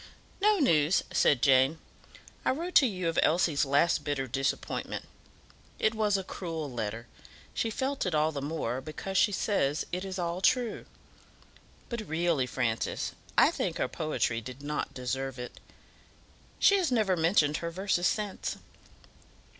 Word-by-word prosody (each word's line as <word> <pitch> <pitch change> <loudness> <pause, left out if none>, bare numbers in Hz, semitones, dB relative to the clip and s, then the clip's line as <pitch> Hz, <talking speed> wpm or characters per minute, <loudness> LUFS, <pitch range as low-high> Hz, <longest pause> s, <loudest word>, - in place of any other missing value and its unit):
"No 420 +1 +4
news," 165 - +3
said 135 -5 +3
Jane. 135 +3 +5 0.7
"I - - +1
wrote 340 +7 -2
to 265 - +3
you 185 -5 -3
of 165 - +1
Elsie's 160 -3 +2
last 145 +5 +2
bitter 145 -2 -1
disappointment. 135 +2 -2 0.7
It 220 - +2
was 210 -2 +1
a 190 - -3
cruel 165 -6 -5
letter; 115 -1 -4 0.5
she 225 - -1
felt 265 0 -2
it 175 - 0
all 155 +1 +2
the 140 -2 -4
more, 135 -4 -2
because 155 +7 -6
she 205 - +4
says 165 -8 0
it 180 +1 -2
is 190 -1 -5
all 175 0 -2
true. 245 +1 +1 1.0
But, 235 -2 -4
really, 160 -5 +1
Francis, 120 -3 -1 0.3
I - - +6
think - - -2
her - - 0
poetry 125 -7 -1
did 130 +4 -9
not 150 +1 -3
deserve 130 +1 -3
it. 125 0 -8 1.0
She 400 - +5
has 350 -7 0
never 215 -6 +2
mentioned 160 -3 +3
her 170 - -3
verses 180 0 0
since." 210 -2 -2
165 Hz, 150 wpm, -29 LUFS, 135-195 Hz, 1.0 s, I